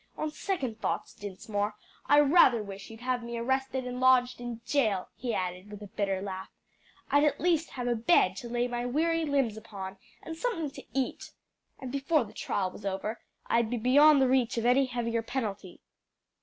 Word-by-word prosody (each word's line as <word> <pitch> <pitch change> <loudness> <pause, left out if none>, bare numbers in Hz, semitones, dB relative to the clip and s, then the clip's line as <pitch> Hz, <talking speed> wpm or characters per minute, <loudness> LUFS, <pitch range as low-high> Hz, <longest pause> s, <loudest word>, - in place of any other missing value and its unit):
On 310 - -2
second 275 - -3
thoughts, - - -2
Dinsmore, 205 +1 -4 0.3
I 290 - +6
rather 275 -7 +5
wish 200 -1 -9
you'd 225 0 -11
have 250 0 -1
me 235 0 -5
arrested 265 +2 -1
and 250 0 -4
lodged 255 -1 +4
in 240 -2 -5
jail," 215 -11 +1
he 245 -2 -3
added 185 -1 -3
with 210 0 -9
a 205 +2 -13
bitter 195 -2 -1
laugh. 190 -1 -6 0.6
"I'd 285 +1 +5
at 290 -2 +2
least 335 -2 +1
have 245 -2 -3
a 240 - +2
bed 225 - +3
to 240 - -6
lay 240 +1 0
my 240 0 -3
weary 325 +6 +1
limbs 270 -7 +1
upon, 195 -3 -8 0.3
and 325 - -6
something 330 - -2
to - - -10 0.2
eat. 260 - -3 0.5
And 260 -2 -7
before 280 +1 +2
the 210 - -12
trial 190 -2 -2
was 210 - -12
over 200 +3 -3 0.3
I'd 235 -1 +1
be 245 - -1
beyond 275 +4 +6
the - - +3
reach 250 -2 +2
of 230 - -1
any 255 +3 +4
heavier 230 -2 -1
penalty." 210 -6 -5
245 Hz, 190 wpm, -29 LUFS, 210-270 Hz, 0.6 s, I